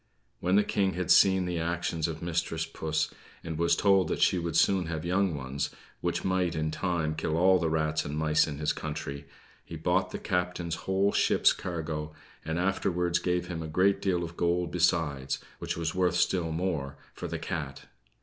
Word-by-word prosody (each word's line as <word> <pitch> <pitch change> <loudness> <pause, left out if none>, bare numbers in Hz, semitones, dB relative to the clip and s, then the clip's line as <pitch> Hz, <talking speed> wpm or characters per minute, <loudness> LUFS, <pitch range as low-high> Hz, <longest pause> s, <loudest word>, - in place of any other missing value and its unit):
When 90 +2 +1
the 105 - +5
King 95 -2 0
had 90 -1 -1
seen 95 -1 +6
the 90 -1 -2
actions 85 -1 -1
of 80 0 -6
mistress 80 -1 -1
puss, 80 0 -2 0.3
and 80 - -4
was 85 0 +3
told 95 -2 +4
that - - -2
she 90 - +3
would 85 -1 -3
soon 95 -4 +3
have 80 -1 -4
young 90 -1 +1
ones, 70 +1 -3 0.3
which - - -2
might 90 -2 +1
in 80 0 -1
time 85 -3 -1
kill 80 0 -1
all 95 +2 +5
the 85 -2 0
rats 80 0 0
and 75 +1 -4
mice 75 0 +3
in 75 -2 -5
his 75 0 0
country, 75 -2 -5 0.4
he - - -9
bought - - +1
the - - -5
captain's 90 -2 -2 0.2
whole 95 +1 +3
ship's - - +4
cargo; 80 -3 -4 0.3
and 80 +1 -2
afterwards 90 -1 +1
gave 90 -1 0
him 85 -2 -4
a 80 - -5
great 95 +5 +2
deal 90 -3 +1
of 85 0 -6
gold 85 0 0
besides, 80 -6 +1 0.2
which - - -3
was 80 -2 -1
worth 90 -1 +1
still 90 -2 +1
more, 80 -5 -2 0.2
for - - -6
the - - -3
cat. 70 -3 -5
85 Hz, 190 wpm, -29 LUFS, 80-90 Hz, 0.4 s, seen